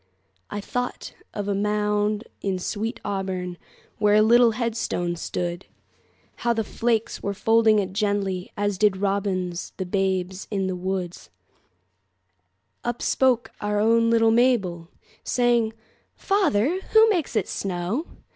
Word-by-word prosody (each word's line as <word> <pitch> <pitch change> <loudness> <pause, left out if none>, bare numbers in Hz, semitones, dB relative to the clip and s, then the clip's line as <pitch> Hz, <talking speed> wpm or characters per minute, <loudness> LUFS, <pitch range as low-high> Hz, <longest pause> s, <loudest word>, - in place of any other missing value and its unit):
I 205 - -4
thought 245 +4 -4 0.2
of 205 -1 -4
a 200 - +1
mound 210 +1 0 0.2
in 195 -2 -1
sweet 215 +6 -3
AuburnWhere 190 -3 -3 0.6
a - - +6
little 235 +1 +5
headstone 220 -7 -2
stood; 175 +1 -4 0.7
How 235 - +1
the 225 -1 -1
flakes 225 +1 -1
were 200 0 -3
folding 225 +1 +4
it 190 -2 -1
gently, 200 -3 -1
As 205 -2 -1
did 210 -3 +3
robins 190 -3 -2
the 190 - -3
babes 190 0 -1
in 195 -3 -1
the 185 -1 -2
wood. 180 -1 -3 1.7
Up 240 0 -2
spoke 255 -3 +2
our 205 0 0
own 230 +2 +4
little 225 -1 +4
Mabel, 205 -9 +2 0.3
Saying, 240 -3 +2 0.4
"Father, 350 - +1
who 440 0 +8
makes 340 - -1
it 210 -4 +1
snow?" 195 - -3
205 Hz, 130 wpm, -24 LUFS, 190-230 Hz, 1.7 s, who